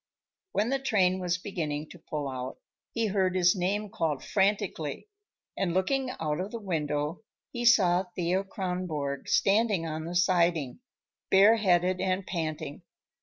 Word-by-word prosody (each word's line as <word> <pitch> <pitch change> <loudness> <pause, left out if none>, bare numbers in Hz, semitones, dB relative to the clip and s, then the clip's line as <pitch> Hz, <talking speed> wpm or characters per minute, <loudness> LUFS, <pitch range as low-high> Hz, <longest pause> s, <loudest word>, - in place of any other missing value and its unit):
When 215 +3 +1
the 270 +1 +1
train 190 -8 +2
was 180 -1 0
beginning 155 -6 -4
to - - -12
pull 150 -2 -4
out, 130 -1 -5 0.3
he 230 -1 0
heard 190 -3 +1
his 180 0 +4
name 200 +3 -1
called 150 -5 -1
frantically, 195 - -1 0.5
and 180 -3 -1
looking 260 +8 +1
out 150 -1 -1
of 190 +2 -3
the 230 - -6
window 155 -4 -2 0.3
he 240 0 -3
saw 190 -6 +5
Thea 180 +2 0
Kronborg 180 - -3
standing 205 -3 +3
on 155 0 -4
the 175 +2 -5
siding, 170 - +2 0.5
bareheaded 190 -3 +4
and 185 0 0
panting. 155 -5 -4
180 Hz, 140 wpm, -28 LUFS, 160-195 Hz, 0.5 s, saw